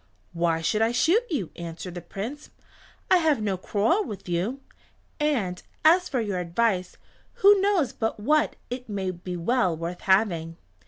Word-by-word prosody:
"Why 165 Hz, -1 st, +1 dB
should 210 Hz, +7 st, 0 dB
I 225 Hz, +1 st, +3 dB
shoot 340 Hz, -, +3 dB
you?" 255 Hz, -, -2 dB
answered 170 Hz, +1 st, -7 dB
the 175 Hz, -, -6 dB
Prince. 240 Hz, -, -7 dB, 0.6 s
"I 370 Hz, -, +8 dB
have 315 Hz, -6 st, +2 dB
no 205 Hz, -3 st, -1 dB
quarrel 220 Hz, -, +1 dB
with 205 Hz, -, -8 dB
you. 190 Hz, +10 st, -2 dB, 0.6 s
And 230 Hz, -13 st, 0 dB, 0.2 s
as 360 Hz, +3 st, +5 dB
for 260 Hz, -, 0 dB
your 205 Hz, -5 st, -2 dB
advice, 180 Hz, +1 st, 0 dB, 0.4 s
who 400 Hz, 0 st, +5 dB
knows 390 Hz, -9 st, +2 dB
but 225 Hz, -1 st, -2 dB
what 300 Hz, +8 st, +2 dB, 0.2 s
it 250 Hz, -1 st, -5 dB
may 195 Hz, -2 st, -2 dB
be 180 Hz, 0 st, -6 dB
well 185 Hz, -1 st, +1 dB
worth 170 Hz, +2 st, -5 dB
having?" 175 Hz, -5 st, +1 dB
210 Hz, 160 wpm, -26 LUFS, 180-280 Hz, 0.6 s, I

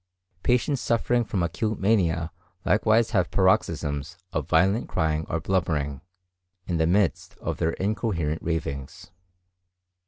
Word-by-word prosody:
Patients 125 Hz, +3 st, +1 dB
suffering 120 Hz, +1 st, +1 dB
from 100 Hz, -4 st, -1 dB
acute 110 Hz, +5 st, -2 dB
mania 85 Hz, -5 st, +1 dB, 0.3 s
likewise 110 Hz, +3 st, +3 dB
have 90 Hz, -5 st, +2 dB
paroxysms 85 Hz, -4 st, +1 dB, 0.2 s
of -, -, -2 dB
violent 95 Hz, +7 st, +3 dB
crying 80 Hz, 0 st, 0 dB
or 85 Hz, -, -1 dB
blubbering, 80 Hz, -6 st, -1 dB, 0.6 s
in 85 Hz, -, -1 dB
the 80 Hz, 0 st, +2 dB
midst 95 Hz, +1 st, +1 dB
of -, -, -4 dB
their 80 Hz, 0 st, 0 dB
incoherent 95 Hz, -6 st, -1 dB
ravings. 70 Hz, -5 st, -4 dB
90 Hz, 120 wpm, -26 LUFS, 80-105 Hz, 0.6 s, likewise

